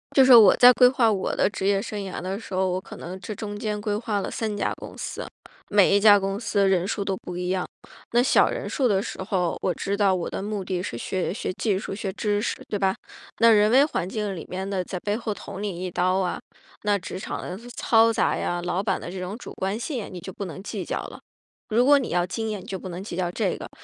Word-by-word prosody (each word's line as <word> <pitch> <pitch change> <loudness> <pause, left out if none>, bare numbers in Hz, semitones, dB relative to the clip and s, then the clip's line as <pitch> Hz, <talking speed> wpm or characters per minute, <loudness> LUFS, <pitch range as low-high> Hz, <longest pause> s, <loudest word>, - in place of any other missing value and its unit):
就 270 - +7
是 260 - +8
我 220 -3 +8
在 250 0 +8
规 250 0 +7
划 245 -4 +3
我 195 -2 -1
的 - - +3
职 195 -1 -3
业 200 -1 +3
生 205 +1 -5
涯 195 -2 -5
的 190 +2 -4
时 225 - -12
候， 190 0 +1
我 185 +1 -2
可 - - -11
能 185 +2 -7
这 215 - -6
中 205 0 -6
间 210 0 -3
规 205 0 -1
划 210 -2 -1
了 - - -4
3 220 -2 -2
家 - - 0
公 - - -10
司。 - - -5 0.5
每 200 -1 +5
一 205 - +5
家 205 -1 +7
公 195 +1 -2
司 200 -4 +1
人 190 -1 +2
数 200 -2 -2
都 195 - 0
不 180 -1 -8
一 180 0 -3
样， 185 -1 -1 0.5
那 240 +1 +5
小 - - +4
人 - - -4
数 260 -3 +1
的 200 -2 +1
时 - - -6
候， 185 -3 0
我 185 - +1
知 195 +4 -2
道 200 -2 +3
我 175 - -3
的 - - -4
目 205 -1 -4
的 180 -1 -2
是 120 -10 -5
学 185 +8 -2
学 185 - -3
技 205 0 0
术、 195 - -5
学 195 -1 -3
知 205 0 0
识， 235 - -1
对 205 - -2
吧？ 190 -1 +2 0.4
那 230 +1 +6
人 210 -1 +5
为 265 +5 +6
环 185 - -3
境 205 -2 -3
里 165 - -8
面 190 +1 -4
的 195 -2 -1
在 180 0 -5
背 205 0 -1
后 225 -1 -3
捅 200 0 -7
你 185 -3 -4
一 180 - -4
刀 185 +2 +1
啊， 190 -2 -1 0.4
那 205 -1 +2
职 185 0 -7
场 - - -5
的 180 - -5 0.2
嘈 230 0 +4
杂 - - +1
呀， 175 - -2
老 180 +2 0
板 195 -2 -1
的 175 - -7
这 190 - -6
种 185 +4 -5
主 - - -9
观 195 +3 -2
性， 240 -4 -4
你 180 - -7
就 190 +2 -8
不 200 - -5
能 185 +1 -7
计 - - -4
较 - - -3
了。 - - -9 0.5
如 240 +3 +3
果 285 0 +6
你 260 - -4
要 175 +1 +1
经 220 +4 -3
验， 210 - -3
你 - - -13
就 190 - -5
不 185 - -7
能 180 +2 -6
计 200 - -6
较 175 -1 -1
这 190 +1 -1
个。 - - -8
200 Hz, 285 characters per minute, -25 LUFS, 185-215 Hz, 0.5 s, 是